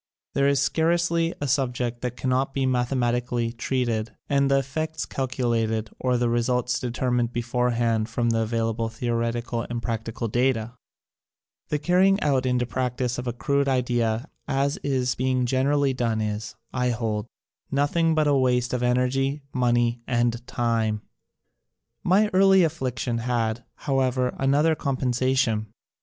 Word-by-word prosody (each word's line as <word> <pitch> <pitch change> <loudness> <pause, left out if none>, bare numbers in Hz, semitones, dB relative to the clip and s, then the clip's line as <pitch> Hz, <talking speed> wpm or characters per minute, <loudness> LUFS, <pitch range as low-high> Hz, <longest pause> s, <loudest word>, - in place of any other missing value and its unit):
There 140 0 +2
is 140 -1 +3
scarcely 170 0 +1
a 145 - -2
subject 125 -3 -1
that 125 -1 -4
cannot 130 +1 0
be 135 -1 +1
mathe 125 -1 +1
matically 120 -1 0
treated 115 -2 -1
and 140 -1 +2
the 135 - +4
effects 155 +4 -2
calculated 115 -4 -1
or 125 -1 +1
the 120 0 +1
results 120 +1 +1
determined 120 -1 -1
beforehand 120 -2 0
from 120 -1 0
the 115 - +1
available 115 0 -1
theoretical 115 0 -2
and 120 -1 -2
practical 115 0 -3
data. 120 0 0 1.0
The 150 - +1
carrying 185 +6 +3
out 135 -3 +2
into 125 -1 +1
practise 125 0 -2
of 125 - -5
a - - +1
crude 140 +3 0
idea 120 -1 0 0.2
as 140 +1 0
is 130 -3 0
being 130 0 0
generally 135 +2 +2
done 115 -3 0
is, 105 0 -3 0.2
I 125 -1 +1
hold, 110 -2 -2 0.4
nothing 160 +4 +2
but 155 -1 +3
a 145 - +3
waste 125 -2 +2
of 125 - -1
energy, 130 +3 +1
money 120 -1 +1
and 120 -1 0
time. 110 -3 0 1.0
My 205 +4 +3
early 190 0 +6
affliction 125 -7 -1
had, 115 -1 -1
however, 130 -2 0
another 145 +4 +3
compensation. 130 -5 0
125 Hz, 140 wpm, -25 LUFS, 120-135 Hz, 1.0 s, early